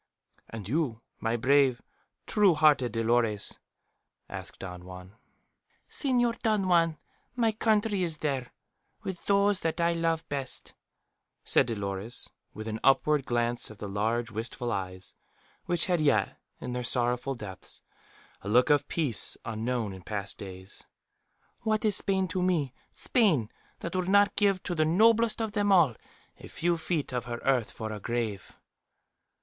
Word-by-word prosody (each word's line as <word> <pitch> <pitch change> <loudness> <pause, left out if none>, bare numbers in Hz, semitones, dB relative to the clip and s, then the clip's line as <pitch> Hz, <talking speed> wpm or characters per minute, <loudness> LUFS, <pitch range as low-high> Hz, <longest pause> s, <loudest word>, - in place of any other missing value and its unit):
"And 110 -4 -7
you, 135 -2 0 0.2
my 115 +1 0
brave, 130 0 +3 0.5
true 200 -5 +4
hearted 150 -6 +4
Dolores?" 115 -2 0 0.7
asked - - -7
Don 90 -2 -8
Juan. 90 +1 -11 0.7
"Señor 245 -4 0
Don 215 -4 +1
Juan, 165 -3 +3 0.4
my 230 -3 +2
country 215 -2 +1
is 165 -3 -1
there, 135 -5 -2 0.5
with 190 -3 -6
those 200 0 +3
that 165 +1 -2
I 170 0 +3
love 165 -1 -1
best," 135 -2 -5 0.7
said - - +3
Dolores, 100 0 -4 0.2
with 110 +1 -8
an 110 0 -3
upward 135 +1 +3
glance 120 0 0
of 110 - -11
the 105 - -6
large 110 +4 -1
wistful 120 +3 -4
eyes, 95 -2 -4 0.5
which 175 -2 +1
had 175 -3 +1
yet, 110 -10 +2 0.2
in - - -5
their 125 - -2
sorrowful 125 +2 0
depths, 100 -5 -9 0.6
a 100 - -6
look 125 +7 +4
of 145 -1 +3
peace 145 -10 +2
unknown 115 -1 -2
in 95 - -10
past 100 +1 -5
days. 95 0 -9 0.7
"What 215 0 0
is 210 -2 +3
Spain 190 -1 0
to 185 +1 -2
me 165 -8 +1 0.2
Spain, 160 - +1 0.3
that 170 +2 -4
would 185 0 0
not 205 +1 +4
give 200 -3 +2
to 180 - -3
the 155 -2 +2
noblest 220 +8 +4
of 220 -2 -1
them 205 -1 +1
all 165 -11 +5 0.4
a - - -10
few 170 0 -1
feet 160 -5 -2
of 125 -1 -2
her 120 -1 -4
earth 130 -5 +2
for 110 -1 -6
a 105 - -5
grave?" 110 -3 -3
135 Hz, 150 wpm, -29 LUFS, 115-180 Hz, 0.7 s, all